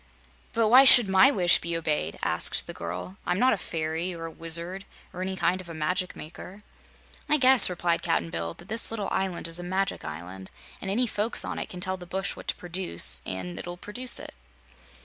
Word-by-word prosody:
"But 225 Hz, -1 st, +1 dB
why 255 Hz, +4 st, +8 dB
should 245 Hz, -5 st, +9 dB
MY 190 Hz, +4 st, +5 dB
wish 180 Hz, -10 st, +4 dB
be 170 Hz, 0 st, -2 dB
obeyed?" 150 Hz, -, -3 dB
asked -, -, +1 dB
the -, -, -6 dB
girl. 90 Hz, +3 st, -7 dB
"I'm 180 Hz, -, -2 dB
not 255 Hz, +5 st, +3 dB
a -, -, +1 dB
fairy 165 Hz, +1 st, -4 dB
or 165 Hz, 0 st, -8 dB
a 165 Hz, -, -7 dB
wizard 170 Hz, +4 st, -3 dB, 0.3 s
or 180 Hz, -, -7 dB
any 190 Hz, 0 st, -3 dB
kind 185 Hz, 0 st, -1 dB
of 175 Hz, -, -14 dB
a 165 Hz, -, -8 dB
magic 180 Hz, +4 st, -3 dB
maker." 180 Hz, +5 st, -12 dB, 0.7 s
"I 300 Hz, -, +3 dB
guess," 260 Hz, -4 st, +7 dB
replied 175 Hz, -1 st, -1 dB
Cap'n 85 Hz, 0 st, -2 dB
Bill, 85 Hz, 0 st, -5 dB
"that 175 Hz, -, -16 dB
this 225 Hz, +2 st, +6 dB
little 215 Hz, -3 st, -3 dB
island 190 Hz, -3 st, -2 dB
is 165 Hz, +1 st, -4 dB
a -, -, -7 dB
magic 190 Hz, +2 st, -3 dB
island, 90 Hz, +5 st, -9 dB, 0.3 s
and 195 Hz, -, -6 dB
any 235 Hz, +6 st, 0 dB
folks 215 Hz, 0 st, -1 dB
on -, -, -5 dB
it -, -, -6 dB
can 180 Hz, -, -9 dB
tell 185 Hz, 0 st, -2 dB
the 180 Hz, -1 st, -12 dB
bush 190 Hz, +2 st, -4 dB
what -, -, -13 dB
to -, -, -1 dB
produce, 90 Hz, -, -1 dB
an' 90 Hz, -1 st, -6 dB
it'll 175 Hz, 0 st, -8 dB
produce 245 Hz, +7 st, 0 dB
it." -, -, -10 dB
180 Hz, 210 wpm, -26 LUFS, 160-195 Hz, 0.7 s, should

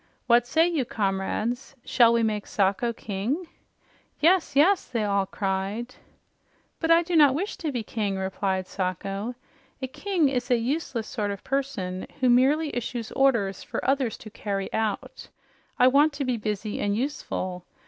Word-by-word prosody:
What 240 Hz, 0 st, +4 dB
say 320 Hz, +6 st, +3 dB
you, 325 Hz, -6 st, 0 dB
comrades? 220 Hz, +5 st, -2 dB
Shall 235 Hz, -2 st, +5 dB
we 235 Hz, 0 st, +2 dB
make 210 Hz, -2 st, -1 dB
Sacho 200 Hz, +4 st, +1 dB
king?" 225 Hz, -, -3 dB, 0.7 s
"Yes, 345 Hz, +1 st, +3 dB
yes!" 350 Hz, +7 st, +4 dB
they 230 Hz, -3 st, -1 dB
all 200 Hz, -2 st, +1 dB
cried. 195 Hz, +6 st, -3 dB, 0.9 s
"But 325 Hz, -, -1 dB
I 335 Hz, +1 st, +6 dB
do 345 Hz, 0 st, -2 dB
not 290 Hz, -4 st, +6 dB
wish 390 Hz, +7 st, -2 dB
to 315 Hz, -4 st, -3 dB
be 240 Hz, -4 st, -3 dB
king," 210 Hz, -3 st, -2 dB
replied 190 Hz, 0 st, -1 dB
Sacho. 195 Hz, +5 st, -3 dB, 0.4 s
"A 260 Hz, -, -2 dB
king 350 Hz, +3 st, 0 dB
is 250 Hz, -2 st, -2 dB
a 245 Hz, -, +4 dB
useless 240 Hz, -2 st, -2 dB
sort 210 Hz, -3 st, -2 dB
of 200 Hz, -1 st, -5 dB
person 205 Hz, -10 st, -2 dB
who 255 Hz, -2 st, +4 dB
merely 285 Hz, +5 st, +3 dB
issues 240 Hz, -1 st, -4 dB
orders 230 Hz, -8 st, +2 dB
for -, -, -5 dB
others 270 Hz, -4 st, +1 dB
to 215 Hz, -, -11 dB
carry 200 Hz, -2 st, -4 dB
out. 220 Hz, -2 st, -3 dB, 0.5 s
I 250 Hz, -, +6 dB
want 285 Hz, +4 st, +4 dB
to 285 Hz, -1 st, -3 dB
be 255 Hz, -1 st, 0 dB
busy 210 Hz, -1 st, -3 dB
and 205 Hz, 0 st, 0 dB
useful. 185 Hz, -9 st, -3 dB
235 Hz, 160 wpm, -26 LUFS, 200-275 Hz, 0.9 s, I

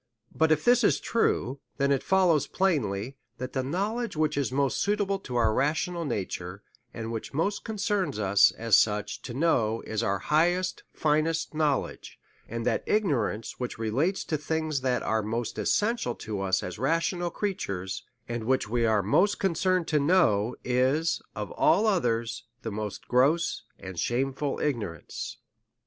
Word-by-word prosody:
But 160 Hz, 0 st, +2 dB
if 155 Hz, -1 st, +2 dB
this 245 Hz, 0 st, +5 dB
be 215 Hz, -, +4 dB
true, 140 Hz, -, 0 dB, 0.2 s
then 140 Hz, 0 st, +2 dB
it 135 Hz, -, +2 dB
follows 180 Hz, -6 st, +3 dB
plainly, 135 Hz, -, 0 dB, 0.2 s
that 130 Hz, +1 st, -5 dB
that 130 Hz, -, 0 dB
knowledge 200 Hz, -, -2 dB
which 155 Hz, -1 st, +1 dB
is 140 Hz, -2 st, 0 dB
most 140 Hz, 0 st, +1 dB
suitable 200 Hz, -1 st, 0 dB
to 125 Hz, -9 st, -7 dB
our 115 Hz, -2 st, +3 dB
rational 165 Hz, -, 0 dB
nature, 100 Hz, -5 st, -4 dB, 0.3 s
and 115 Hz, -2 st, -5 dB
which 115 Hz, +4 st, -5 dB
most 200 Hz, +7 st, 0 dB
concerns 205 Hz, -, -1 dB
us, 100 Hz, -1 st, +5 dB
as 115 Hz, -3 st, +3 dB
such 105 Hz, -1 st, +1 dB
to 120 Hz, -, -7 dB
know, 120 Hz, -8 st, +1 dB
is 110 Hz, -1 st, -2 dB
our 100 Hz, 0 st, +1 dB
highest, 175 Hz, -, +1 dB
finest 155 Hz, +2 st, 0 dB
knowledge; 150 Hz, -3 st, -1 dB, 0.3 s
and 115 Hz, 0 st, -4 dB
that -, -, +1 dB
ignorance 145 Hz, -, 0 dB
which 125 Hz, -1 st, -4 dB
relates 130 Hz, -, 0 dB
to 155 Hz, -, -2 dB
things 155 Hz, -2 st, -1 dB
that 130 Hz, -1 st, 0 dB
are 110 Hz, 0 st, +1 dB
most 115 Hz, +2 st, -3 dB
essential 210 Hz, -, +1 dB
to 105 Hz, -3 st, -5 dB
us, 95 Hz, -1 st, +1 dB
as 90 Hz, +2 st, -6 dB
rational 165 Hz, +6 st, 0 dB
crea 205 Hz, +3 st, -1 dB
tures, 95 Hz, -, -4 dB, 0.3 s
and 120 Hz, -1 st, -4 dB
which 130 Hz, -2 st, +1 dB
we 115 Hz, +1 st, +1 dB
are 110 Hz, -2 st, +2 dB
most 185 Hz, -, +3 dB
concerned 185 Hz, -1 st, +1 dB
to 150 Hz, -, +3 dB
know, 140 Hz, -, +3 dB
is 130 Hz, +6 st, +1 dB
of -, -, -5 dB
all 220 Hz, -, +3 dB
others, 120 Hz, -, 0 dB, 0.2 s
the 115 Hz, -, -3 dB
most 105 Hz, 0 st, -5 dB
gross 145 Hz, +7 st, +2 dB
and 95 Hz, -3 st, -7 dB
shameful 135 Hz, +3 st, -1 dB
ignorance. 105 Hz, -, -4 dB
135 Hz, 160 wpm, -27 LUFS, 115-170 Hz, 0.3 s, this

